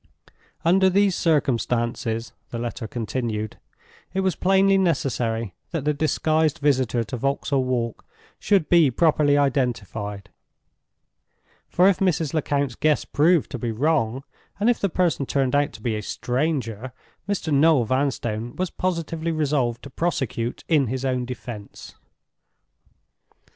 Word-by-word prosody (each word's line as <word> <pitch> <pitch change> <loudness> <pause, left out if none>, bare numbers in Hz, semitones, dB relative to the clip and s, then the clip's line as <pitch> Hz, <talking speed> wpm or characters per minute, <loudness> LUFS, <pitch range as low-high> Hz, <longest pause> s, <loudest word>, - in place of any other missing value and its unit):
Under 190 +3 +5
these 195 +1 +3
circumstances 120 -6 0 0.2
(the 120 - -5
letter 120 0 -4
continued) 110 -2 -3 0.6
it 190 - +2
was 190 -1 0
plainly 195 +1 +3
necessary 120 - 0 0.2
that 160 -5 -3
the 150 - +2
disguised 155 +1 +1
visitor 130 -5 +1
to 120 +3 -5
Vauxhall 140 +1 0
Walk 120 -3 -2 0.4
should 195 -6 +2
be 170 -5 +5
properly 145 +1 +3
identified; 110 -7 -1 1.4
for 180 +2 +4
if 195 - +3
Mrs. 165 -6 +1
Lecount's 140 -4 0
guess 155 +4 +1
proved 160 +1 +2
to 125 - -4
be 115 0 -2
wrong, 130 -1 0 0.4
and 220 +4 +4
if 240 - -2
the 200 - 0
person 165 -6 0
turned 135 -2 0
out 145 +1 +2
to - - -12
be 115 -3 0
a 105 - -3
stranger, 125 -1 -2 0.4
Mr. 175 -6 -1
Noel 145 -3 +4
Vanstone 120 -3 -1
was 185 -1 -2
positively 165 -2 -2
resolved 140 -6 0
to 140 - -10
prosecute 135 -7 -2
in 150 -5 +3
his 130 +3 -3
own 125 -1 0
defense. 120 -4 -8
140 Hz, 130 wpm, -23 LUFS, 120-160 Hz, 1.4 s, Under